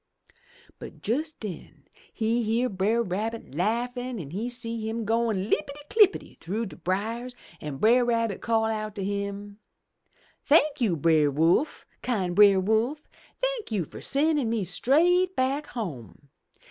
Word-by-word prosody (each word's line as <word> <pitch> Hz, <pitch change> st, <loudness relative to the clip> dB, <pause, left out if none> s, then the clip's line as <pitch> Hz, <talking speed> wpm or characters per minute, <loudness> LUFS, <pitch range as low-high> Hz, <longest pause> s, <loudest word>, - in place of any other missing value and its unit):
"But -, -, -10 dB
jes' 290 Hz, +8 st, 0 dB
den 205 Hz, -, -9 dB, 0.3 s
he 230 Hz, +1 st, 0 dB
hear 230 Hz, +3 st, +1 dB
Brer 210 Hz, +5 st, +1 dB
Rabbit 220 Hz, -, -4 dB
laughin' 240 Hz, -, -2 dB
an' 145 Hz, -5 st, -7 dB, 0.2 s
see 230 Hz, -2 st, -4 dB
him 225 Hz, 0 st, -3 dB
goin* 225 Hz, -3 st, +1 dB
Uppity 280 Hz, +8 st, -2 dB
clippity 420 Hz, -3 st, +3 dB
through 210 Hz, +7 st, -3 dB
de 180 Hz, -7 st, -9 dB
briers, 220 Hz, +9 st, -3 dB, 0.3 s
an' 150 Hz, -3 st, -5 dB
Brer 235 Hz, -, +4 dB
Rabbit 230 Hz, -4 st, 0 dB
call 225 Hz, -1 st, +1 dB
out 215 Hz, -1 st, -3 dB
to 200 Hz, -, -4 dB
him. 200 Hz, +1 st, -4 dB, 0.8 s
Thank 295 Hz, -2 st, +3 dB
you. 195 Hz, -8 st, +2 dB
Brer 155 Hz, -1 st, +3 dB
Wolf, 165 Hz, -, +1 dB, 0.2 s
kind 190 Hz, -8 st, -1 dB
Brer 200 Hz, -1 st, +7 dB
Wolf! 220 Hz, +10 st, 0 dB, 0.3 s
Thank -, -, -2 dB
you 200 Hz, -5 st, 0 dB
fur -, -, -11 dB
sendin' 290 Hz, -3 st, +1 dB
me 225 Hz, -3 st, 0 dB
straight 345 Hz, -, +2 dB
back 275 Hz, +3 st, 0 dB
home! 145 Hz, -, -7 dB
225 Hz, 140 wpm, -26 LUFS, 195-250 Hz, 0.8 s, Brer